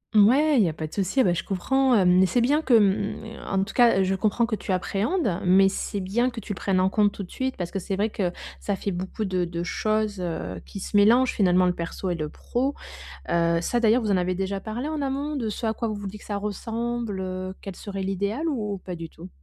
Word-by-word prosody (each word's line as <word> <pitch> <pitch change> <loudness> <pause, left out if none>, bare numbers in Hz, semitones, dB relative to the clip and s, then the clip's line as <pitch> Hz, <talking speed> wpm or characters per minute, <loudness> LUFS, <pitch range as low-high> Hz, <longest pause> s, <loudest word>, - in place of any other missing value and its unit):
Mouais, 265 +8 +5
il - - +6
y 175 - +2
a - - -4
pas 155 0 -5
de 155 - -10
souci, 205 +7 +1
bah 180 - +3
je 175 - -2
comprends. 260 +7 +2
Hem, 185 -2 +5
c'est 245 - +1
bien 285 +6 +3
que, 260 -6 +3
mmh 200 -1 +2 0.4
en 195 0 +2
tout 210 - -7
cas, 235 -6 +5
je 190 +1 +1
comprends 215 +4 +1
que 230 -1 -1
tu 200 - -5
appréhendes 200 - 0
mais 190 +1 +5
c'est 200 +1 -3
bien 230 +7 +1
que 240 -2 -7
tu 205 - -5
le - - -7
prennes 190 -2 +1
en 185 - +3
compte 205 +1 +3
tout 200 - -7
de 180 - -12
suite. 260 0 -2
Parce 175 -2 -4
que 195 - -2
c'est 190 +1 -3
vrai 205 +3 0
que 185 -5 -1 0.3
ça 200 - -2
fait 200 - -3
beaucoup 185 +4 -4
de 185 -2 0
de 170 0 -3
choses, 215 +1 -1
heu, 90 - -4
qui 195 - -7
se 200 - -6
mélangent 235 +6 +5
finalement 185 -2 +3
le 180 - +2
perso 175 +2 -4
et - - -1
le 155 -2 -3
pro. 265 - -2 0.5
Heu, 170 0 +2
ça 240 +8 0
d'ailleurs, 230 +2 +4
vous 215 -3 -1
en 195 - +4
avez 180 0 0
déjà 195 +1 -2
parlé 235 +8 -4
en 310 -2 -3
amont 280 +2 -2
de 230 -5 -2
ce 225 +2 -4
à 220 - 0
quoi 230 - -2
vous 215 - -2
vous 205 0 -6
dites 205 +2 -7
que - - -14
ça 205 -1 -2
ressemble, 225 +1 -3
heu, 185 0 -4
quel 195 -2 -8
serait 195 -2 -5
l'idéal 200 - -1
ou 210 -9 -2
pas 180 0 -7
du 165 -1 -7
tout? 170 +3 -11
200 Hz, 260 wpm, -25 LUFS, 185-230 Hz, 0.5 s, il